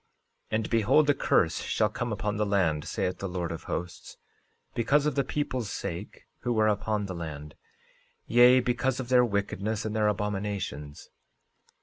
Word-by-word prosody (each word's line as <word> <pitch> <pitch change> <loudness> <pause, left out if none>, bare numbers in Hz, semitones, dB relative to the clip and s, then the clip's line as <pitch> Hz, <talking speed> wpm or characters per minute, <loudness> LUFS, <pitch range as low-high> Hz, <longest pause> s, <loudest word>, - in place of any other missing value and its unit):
13:17 - - -1
And 110 - -3
behold, 125 +7 +4
a - - +2
curse - - +2
shall 110 - +1
come 120 +2 -3
upon 105 0 -2
the 105 - +1
land, 85 -7 +1
saith 90 - -2
the 100 - -4
Lord 90 -2 -3
of 85 - -7
Hosts, 90 0 -5 0.6
because 140 +6 +2
of 150 - +1
the 140 - +1
people's 130 -7 -2
sake 100 +1 -6
who 120 -2 -1
are 110 - +4
upon 105 0 0
the 95 - -5
land, 75 -4 -7 0.7
yea, 125 +2 +6
because 125 +1 0
of 125 -2 -5
their 125 -1 +6
wickedness 100 0 -2
and 110 0 -3
their 105 -1 +2
abominations. 100 -8 -3
105 Hz, 165 wpm, -28 LUFS, 95-120 Hz, 0.7 s, yea